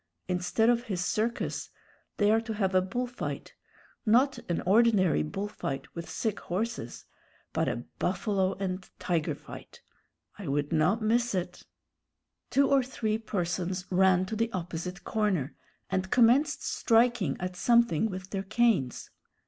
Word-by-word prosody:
Instead 180 +5 +1
of 240 0 +3
his 180 -6 -2
circus, 230 +3 -1 0.5
they 205 0 +4
are 225 +1 +4
to 225 -1 -5
have 195 -2 0
a 185 - +5
bull 220 +7 -2
fight 245 0 -6 0.5
not 250 +3 +3
an 170 - 0
ordinary 200 -4 +4
bull 195 +6 -3
fight 140 -9 -5
with 165 -1 -7
sick 220 +4 -2
horses, 220 +7 -4 0.5
but - - +1
a - - -3 0.2
buffalo 195 -3 0
and 190 -1 -4
tiger 170 -4 -1
fight. - - -12 0.6
I 195 - -6
would 145 +3 -1
not 180 +8 +2
miss 235 0 +2
it 180 -1 -4 0.4
" - - -56
Two 280 0 +3
or 275 -1 +4
three 225 -4 -2
persons 180 -3 -2
ran 185 0 +4
to 220 - -4
the 230 +1 0
opposite 180 +1 -5
corner, 190 -10 0 0.4
and 190 -1 -1
commenced 255 +7 +4
striking 230 - +2
at 180 0 -4
something 235 -1 +3
with 185 -1 -7
their 195 - -1
canes. 200 - +1
195 Hz, 150 wpm, -29 LUFS, 180-230 Hz, 0.6 s, a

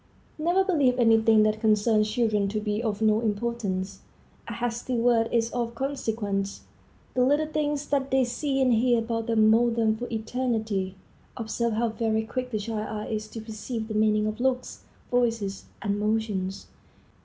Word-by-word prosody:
Never 350 +5 +2
believe 285 -10 +2
any 225 -2 +5
thing 220 -1 +5
that 215 0 +1
concerns 215 0 +3
children 215 -3 +1
to 215 +2 -2
be 210 0 -2
of 220 -2 -2
no 215 0 +4
importance. 205 -4 -2 0.5
A - - -5
hasty 240 +1 -2
word 230 -1 +3
is 230 -1 +1
of 235 -1 -3
consequence. 220 -7 -2 0.5
The 250 - +2
little 290 +4 +3
things 295 -1 -1
that 275 -1 0
they 265 0 +3
see 270 +3 -2
and 255 -2 +3
hear 240 +1 +3
about 230 0 -2
them 220 -2 +4
mold 235 +1 +3
them 220 -2 +2
for 245 +2 -5
eternity. 220 -4 -2 0.4
Observe 230 0 -1
how 230 +2 +1
very 220 -1 -1
quick 250 +2 -4
the 220 - -2
child's 215 0 -4
eye 215 +1 -4
is 215 0 -3
to 225 +1 -8
perceive 220 +1 -5
the - - -3
meaning 215 0 +2
of 215 +2 -3
looks, 255 0 -1 0.3
voices, 225 -5 0 0.2
and 205 0 -1
motions. 210 -3 -1
225 Hz, 170 wpm, -26 LUFS, 215-245 Hz, 0.5 s, any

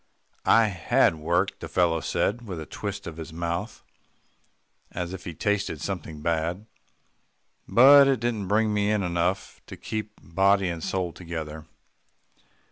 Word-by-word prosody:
"I 115 0 +6
had 90 -4 +2
work," 85 +5 0
the - - -6
fellow 85 -2 +2
said 115 +8 -1
with 90 -4 -5
a 80 - -6
twist 100 +3 -6
of 80 -1 -7
his 80 0 -7
mouth, 85 +1 -4 1.1
as 90 0 -4
if 95 -1 -8
he 85 - -6
tasted 100 -5 -1
something 80 -4 -5
bad, 85 +4 -1 1.0
"but 140 +3 +8
it 135 -3 +2
didn't 115 -4 -2
bring 105 +2 +2
me 105 0 +1
in 105 -2 +1
enough 90 +2 -2
to - - -9
keep 110 -1 -5
body 95 +2 +2
and 85 -2 -5
soul 90 -3 -2
together." 80 -3 -7
90 Hz, 145 wpm, -26 LUFS, 85-105 Hz, 1.1 s, but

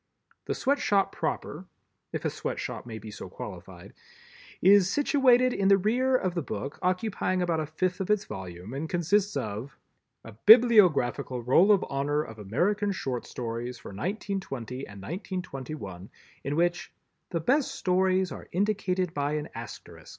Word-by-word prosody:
The - - -2
Sweatshop 255 -8 +1
proper—if - - -6
a - - +2
Sweatshop - - -5
may 110 -2 -6
be 110 -1 -9
so - - -8
qualified—is 190 0 -1
situated 255 -2 +4
in 195 - +1
the 195 0 +6
rear 245 +7 +2
of 185 -8 0
the 170 - -1
book, 135 +1 -5
occupying 185 0 0
about 170 -2 0
a 155 - -2
fifth 180 +5 -1
of 190 - -3
its 210 -1 +2
volume, 95 +1 -8
and 150 +4 -4
consists 185 +1 +1
of: 110 +1 -5 0.5
A 115 - -10
Bibliographical 180 - +5
Roll 170 - +5
of 200 -2 +4
Honor 145 +2 0
of 110 -6 -11
American 190 - 0
Short 130 -10 -4
Stories 120 +1 -5
for - - -10
1920 135 - -4
and 100 0 -11
1921 135 - -6 0.3
in 140 +2 -2
which 175 +1 0 0.4
"the 170 - -1
best 260 - +2
stories 185 -1 +1
are - - -8
indicated 185 -2 0
by 145 +1 -1
an 150 0 -3
Asterisk." 115 -2 -10
175 Hz, 145 wpm, -28 LUFS, 125-200 Hz, 0.5 s, the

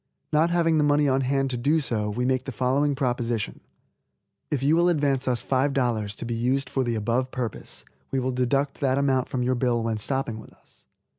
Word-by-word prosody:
Not 155 +3 +4
having 165 -2 +2
the - - +3
money 145 0 +3
on 135 0 +2
hand 135 0 0
to 125 - -2
do 145 +7 +2
so, 110 -7 -1
we 120 +4 -2
make 130 0 0
the 135 - -4
following 135 +4 +1
proposition: 120 -5 -2 0.9
If 140 -3 -1
you 150 +3 +4
will 175 +1 +4
advance 140 -5 +1
us 125 -3 0
$5, 125 -6 0
to - - -6
be 120 - -3
used 125 +4 0
for 135 - +1
the 120 -2 -1
above 115 +4 0
purpose, 125 -4 -5 0.2
we 135 - -2
will 130 0 -1
deduct 135 +3 0
that 135 -1 +1
amount 135 -2 +1
from 125 -1 -1
your 130 +1 +1
bill 120 -2 0
when 115 -1 -1
stopping 115 0 -2
with 110 - -13
us. - - -25
130 Hz, 210 wpm, -25 LUFS, 120-140 Hz, 0.9 s, Not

